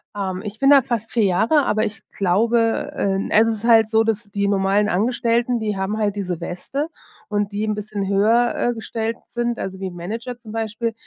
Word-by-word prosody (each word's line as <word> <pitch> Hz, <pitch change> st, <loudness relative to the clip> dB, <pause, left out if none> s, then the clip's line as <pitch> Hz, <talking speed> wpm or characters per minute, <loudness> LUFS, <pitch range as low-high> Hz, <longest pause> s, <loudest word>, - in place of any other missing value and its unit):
Ähm, 190 Hz, -2 st, -3 dB
ich 210 Hz, +1 st, -7 dB
bin 275 Hz, -, +4 dB
da 280 Hz, -2 st, +8 dB
fast 230 Hz, -3 st, -3 dB
4 230 Hz, -, +2 dB
Jahre, 220 Hz, -, +3 dB
aber 215 Hz, +1 st, +1 dB
ich 220 Hz, +1 st, -5 dB
glaube 225 Hz, +8 st, +1 dB
ähm, 195 Hz, 0 st, -1 dB
es 220 Hz, +2 st, +5 dB
ist 220 Hz, -2 st, -2 dB
halt 225 Hz, -2 st, +5 dB
so, 225 Hz, 0 st, +3 dB
dass 225 Hz, 0 st, -1 dB
die 200 Hz, 0 st, -2 dB
normalen 200 Hz, +1 st, +2 dB
Angestellten 235 Hz, +3 st, +1 dB
die 210 Hz, -2 st, -2 dB
haben 190 Hz, +3 st, -2 dB
halt 205 Hz, -2 st, 0 dB
diese 180 Hz, -4 st, -3 dB
Weste, 275 Hz, -, -4 dB, 0.4 s
und 205 Hz, -1 st, -1 dB
die 210 Hz, -, -2 dB
'n 215 Hz, -, -1 dB
bisschen 210 Hz, -1 st, -4 dB
höher, 220 Hz, +5 st, +3 dB
äh, 240 Hz, -, 0 dB
gestellt 225 Hz, 0 st, -3 dB
sind, 240 Hz, 0 st, -2 dB
also, 190 Hz, 0 st, -5 dB
wie 190 Hz, -1 st, -3 dB
Manager 220 Hz, +8 st, -6 dB
zum 230 Hz, -3 st, -12 dB
Beispiel, 225 Hz, +1 st, -2 dB
215 Hz, 200 wpm, -21 LUFS, 200-230 Hz, 0.4 s, da